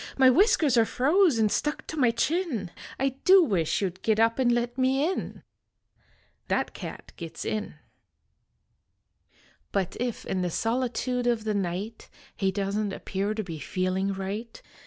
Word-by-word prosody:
My 260 Hz, -1 st, +7 dB
whiskers 305 Hz, -, +4 dB
are 230 Hz, -, +6 dB
froze 295 Hz, -, +3 dB
nd 215 Hz, -2 st, +3 dB
stuck 295 Hz, 0 st, -1 dB
to -, -, -6 dB
my 255 Hz, -6 st, +3 dB
chin. 250 Hz, -, -1 dB, 0.3 s
I 270 Hz, +1 st, +2 dB
do 380 Hz, 0 st, +7 dB
wish 190 Hz, -, 0 dB
you 190 Hz, -, 0 dB
d 185 Hz, -, -22 dB
git 220 Hz, -1 st, +1 dB
up 230 Hz, +2 st, +3 dB
and 245 Hz, -2 st, +3 dB
let 240 Hz, 0 st, 0 dB
me 265 Hz, +3 st, +2 dB
in." 375 Hz, -, -4 dB, 1.0 s
That -, -, 0 dB
cat -, -, -8 dB
gits 165 Hz, -2 st, -7 dB
in. 215 Hz, -6 st, -3 dB, 2.0 s
But 190 Hz, -2 st, -1 dB
if 245 Hz, -1 st, -3 dB
in 185 Hz, -, -1 dB
the 180 Hz, -, 0 dB
solitude 245 Hz, +4 st, -1 dB
of 235 Hz, -3 st, +1 dB
the 215 Hz, -1 st, -1 dB
night 200 Hz, +3 st, -3 dB, 0.3 s
He 195 Hz, -1 st, 0 dB
doesn 200 Hz, +2 st, -1 dB
t 195 Hz, -, -5 dB
appear 200 Hz, +2 st, -3 dB
to 215 Hz, -, -2 dB
be 165 Hz, -5 st, -7 dB
feeling 185 Hz, +4 st, -1 dB
right. 200 Hz, +4 st, -5 dB
225 Hz, 160 wpm, -27 LUFS, 195-255 Hz, 2.0 s, My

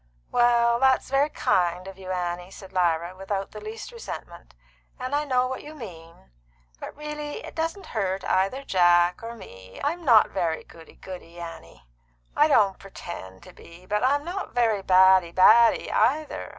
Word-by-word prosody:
"Well, 235 Hz, -1 st, +3 dB
that's 265 Hz, 0 st, +2 dB
very 275 Hz, +2 st, +3 dB
kind 180 Hz, -, 0 dB
of 195 Hz, 0 st, -10 dB
you, 185 Hz, -1 st, -9 dB
Annie," 180 Hz, -1 st, -3 dB
said 190 Hz, 0 st, -13 dB
Lyra, 175 Hz, 0 st, 0 dB
without 195 Hz, +1 st, -4 dB
the 215 Hz, -, -9 dB
least 215 Hz, -, -8 dB
resentment. 470 Hz, -1 st, -9 dB, 0.4 s
"And 255 Hz, +2 st, -5 dB
I 295 Hz, +1 st, +1 dB
know 255 Hz, -3 st, +1 dB
what 260 Hz, 0 st, -4 dB
you 305 Hz, +1 st, -11 dB
mean. 165 Hz, -, -12 dB, 0.5 s
But -, -, -7 dB
it -, -, -15 dB
really 300 Hz, +6 st, -6 dB
doesn't 330 Hz, +4 st, -3 dB
hurt 195 Hz, -3 st, -2 dB
either 195 Hz, +9 st, 0 dB
Jack 175 Hz, -4 st, +3 dB
or 230 Hz, +1 st, -7 dB
me. 95 Hz, -, -13 dB
I'm 335 Hz, +5 st, -2 dB
not 235 Hz, -7 st, +5 dB
very 170 Hz, -4 st, -2 dB
goody 165 Hz, -1 st, -16 dB
goody, 175 Hz, -2 st, -11 dB
Annie; 85 Hz, -, -10 dB, 0.5 s
I 300 Hz, -, +5 dB
don't 205 Hz, -10 st, +3 dB
pretend 95 Hz, -, -10 dB
to -, -, -14 dB
be; 170 Hz, +2 st, -15 dB
but 210 Hz, +3 st, -1 dB
I'm 285 Hz, +3 st, +2 dB
not 370 Hz, -2 st, -6 dB
very 225 Hz, -4 st, +2 dB
baddy 185 Hz, -2 st, +5 dB
baddy 225 Hz, +6 st, +5 dB
either. 290 Hz, +8 st, 0 dB
195 Hz, 165 wpm, -25 LUFS, 175-260 Hz, 0.5 s, not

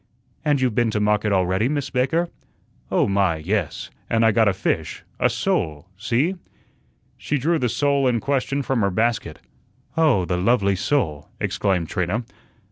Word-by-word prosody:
"And 145 Hz, -3 st, +2 dB
you've 130 Hz, -3 st, +1 dB
been 120 Hz, +1 st, +2 dB
to 105 Hz, -, -1 dB
market 105 Hz, 0 st, +1 dB
already, 95 Hz, +4 st, +1 dB
Miss 140 Hz, -2 st, -2 dB
Baker?" 145 Hz, +7 st, +1 dB, 0.6 s
"Oh, -, -, +2 dB
my, 100 Hz, -4 st, +2 dB
yes; 95 Hz, +7 st, -3 dB, 0.2 s
and 115 Hz, 0 st, +3 dB
I 115 Hz, -, +5 dB
got 110 Hz, 0 st, +3 dB
a -, -, +5 dB
fish 95 Hz, -, -2 dB, 0.2 s
a -, -, +3 dB
sole 75 Hz, +2 st, -1 dB
see." 120 Hz, -, 0 dB, 0.8 s
She 150 Hz, -, -1 dB
drew 160 Hz, +5 st, +1 dB
the 125 Hz, -, 0 dB
sole 140 Hz, +2 st, +1 dB
in 120 Hz, -2 st, +2 dB
question 140 Hz, +2 st, -1 dB
from 130 Hz, -3 st, 0 dB
her 100 Hz, -, +2 dB
basket. 115 Hz, +5 st, -1 dB, 0.6 s
"Oh, 150 Hz, -, +3 dB
the 90 Hz, +1 st, -1 dB
lovely 100 Hz, 0 st, +2 dB
sole!" 90 Hz, -, -1 dB
exclaimed 95 Hz, -5 st, 0 dB
Trina. 95 Hz, +5 st, -1 dB
115 Hz, 160 wpm, -22 LUFS, 95-135 Hz, 0.8 s, I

